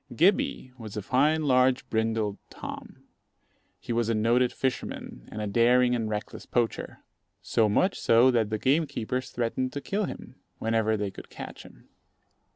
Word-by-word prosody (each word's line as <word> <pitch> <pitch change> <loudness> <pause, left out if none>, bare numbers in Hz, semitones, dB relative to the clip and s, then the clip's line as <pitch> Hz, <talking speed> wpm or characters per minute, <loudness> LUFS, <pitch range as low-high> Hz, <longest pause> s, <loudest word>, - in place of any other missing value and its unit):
Gibbey 170 - +2
was 110 -2 -7
a 105 - -3
fine, 150 +8 +2
large, 130 -2 +3
brindled 110 -2 0
Tom. - - -9 0.8
He 120 - -4
was 115 -1 +1
a 115 - +2
noted 120 +3 +3
fisherman 125 - -4
and 105 0 -4
a - - -1
daring 120 +4 +4
and 115 -3 -1
reckless 105 0 -5
poacher, 120 -2 -2 0.4
so 110 -2 +2
much 185 - +2
so 120 +3 +5
that 115 -4 +1
the 110 - -1
gamekeepers 130 -2 0
threatened 125 +2 -2
to 145 - -3
kill 200 +7 -1
him, - - -9 0.2
whenever 110 -1 +1
they 100 -1 -2
could - - -11
catch - - -9
him. - - -16
120 Hz, 160 wpm, -27 LUFS, 110-130 Hz, 0.8 s, so